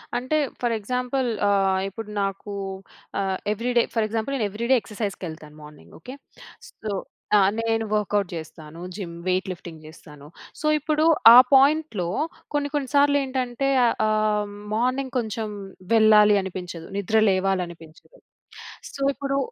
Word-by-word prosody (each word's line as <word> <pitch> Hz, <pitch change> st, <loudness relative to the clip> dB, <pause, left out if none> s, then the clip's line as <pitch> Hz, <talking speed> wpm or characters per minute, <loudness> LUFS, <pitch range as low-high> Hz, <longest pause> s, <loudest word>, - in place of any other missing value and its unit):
అంటే, 255 Hz, +5 st, -1 dB, 0.3 s
for 240 Hz, -1 st, +1 dB
example 250 Hz, +4 st, -2 dB, 0.2 s
ఆహ్, 195 Hz, -1 st, +2 dB
ఇప్పుడు 210 Hz, +2 st, -8 dB
నాకు, 195 Hz, +1 st, -4 dB, 0.7 s
ఆహ్, 190 Hz, -1 st, -1 dB, 0.2 s
ఎవ్రిడే 240 Hz, +2 st, +1 dB
ఫర్ 225 Hz, -2 st, +1 dB
ఎగ్జాంపుల్, 225 Hz, +4 st, -3 dB
నేను 225 Hz, -6 st, 0 dB
ఎవ్రిడే 235 Hz, +5 st, +1 dB
ఎక్సర్సైజ్‌కెళ్తాను 180 Hz, -8 st, -6 dB
మార్నింగ్ 150 Hz, 0 st, -15 dB
ఓకే. 250 Hz, -, -10 dB, 0.6 s
సో, 220 Hz, -, -8 dB, 0.5 s
ఆ! -, -, +6 dB, 0.2 s
నేను 225 Hz, 0 st, 0 dB
వర్కౌట్ 205 Hz, -2 st, 0 dB
చేస్తాను. 160 Hz, 0 st, -9 dB
జిమ్, 175 Hz, -5 st, -6 dB
వెయిట్ 185 Hz, +2 st, 0 dB
లిఫ్టింగ్ 170 Hz, -3 st, -10 dB
చేస్తాను. 150 Hz, -2 st, -14 dB, 0.3 s
సో 305 Hz, -, -2 dB
ఇప్పుడు, 305 Hz, +1 st, 0 dB, 0.3 s
ఆ -, -, +11 dB, 0.2 s
పాయింట్‌‌లో, 275 Hz, -, +3 dB, 0.5 s
కొన్ని 290 Hz, 0 st, 0 dB
కొన్ని 275 Hz, -3 st, -2 dB
సార్లేంటంటే, 275 Hz, -2 st, +1 dB, 0.2 s
ఆహ్, 230 Hz, -, +2 dB
ఆహ్, 215 Hz, -1 st, +1 dB, 0.3 s
మార్నింగ్ 255 Hz, +2 st, -1 dB
కొంచెం, 220 Hz, -1 st, -4 dB, 0.4 s
వెళ్ళాలి 210 Hz, -2 st, +6 dB
అనిపించదు. 180 Hz, -3 st, -7 dB
నిద్రలేవాలనిపించదు. 190 Hz, -, -1 dB, 0.8 s
సో 275 Hz, -, -8 dB
ఇప్పుడు 275 Hz, 0 st, -2 dB
215 Hz, 125 wpm, -24 LUFS, 185-250 Hz, 0.8 s, ఆ